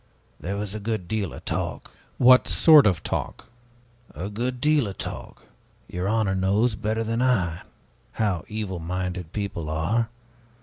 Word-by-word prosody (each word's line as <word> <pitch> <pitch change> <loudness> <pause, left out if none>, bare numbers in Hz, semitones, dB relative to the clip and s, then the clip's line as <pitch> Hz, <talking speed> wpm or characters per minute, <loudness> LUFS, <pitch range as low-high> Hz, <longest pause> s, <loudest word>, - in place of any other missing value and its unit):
There 95 +5 -4
was 105 -1 -4
a 110 - -4
good 105 -3 -3
deal 105 -4 -2
of - - -11
talk." - - -3 0.3
"What 125 0 +6
sort 155 -7 +7
of 90 -4 0
talk?" - - -4 0.7
"A 90 +7 -4
good 125 +4 -3
deal 150 -3 +3
of 95 - -7
talk. - - -7 0.4
Your 90 +2 -3
honor 110 -3 +1
knows, 100 +5 +2
better 110 +2 -2
than 115 +2 -1
I, 95 -10 +1 0.5
how 100 -6 -1
evil 105 -4 -4
minded 90 0 -4
people 100 -7 -4
are. 95 +10 0
105 Hz, 150 wpm, -25 LUFS, 90-115 Hz, 0.7 s, sort